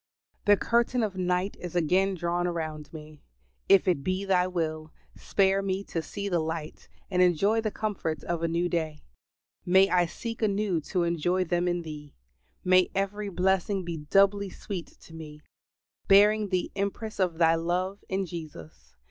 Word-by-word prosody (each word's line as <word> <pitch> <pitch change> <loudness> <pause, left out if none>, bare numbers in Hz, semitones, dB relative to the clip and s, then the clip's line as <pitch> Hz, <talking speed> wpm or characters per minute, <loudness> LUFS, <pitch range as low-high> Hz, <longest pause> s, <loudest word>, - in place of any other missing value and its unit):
The 205 0 +6
curtain 235 +2 +1
of 205 -3 -2
night 180 +1 -1
is 180 -1 -7
again 185 +4 +2
drawn 175 0 -1
around 155 -3 -4
me. 155 -2 -11 0.5
If 195 -1 +6
it 170 -7 +1
be 185 +3 -1
Thy 185 -2 +2
will, 155 -3 -3 0.2
spare 195 0 +1
me 195 0 -2
to 165 - -3
see 200 +5 -5
the 175 -3 +1
light 160 -1 -5 0.2
and 180 -1 +2
enjoy 195 +6 +3
the 220 - -1
comforts 190 -9 -3
of 170 -1 -3
a 165 - +1
new 170 +2 0
day; 160 -3 -3 0.6
may 190 +2 +4
I 180 -1 +3
seek 230 +7 -7
anew 200 -5 0
to 180 - 0
enjoy 170 +2 +1
them 175 0 0
in 175 -1 -1
Thee; 150 -2 -9 0.5
may 185 0 +4
every 200 +1 -2
blessing 190 +1 0
be 170 -1 -4
doubly 195 +6 +2
sweet 185 -1 -6
to 165 - -15
me, 155 -2 -9 0.7
bearing 210 +1 +5
the 185 -1 -1
impress 200 +2 -4
of 180 -4 +1
Thy 165 -1 +4
love 180 +4 -2
in 190 0 -1
Jesus. 155 - -10
180 Hz, 165 wpm, -27 LUFS, 165-195 Hz, 0.7 s, The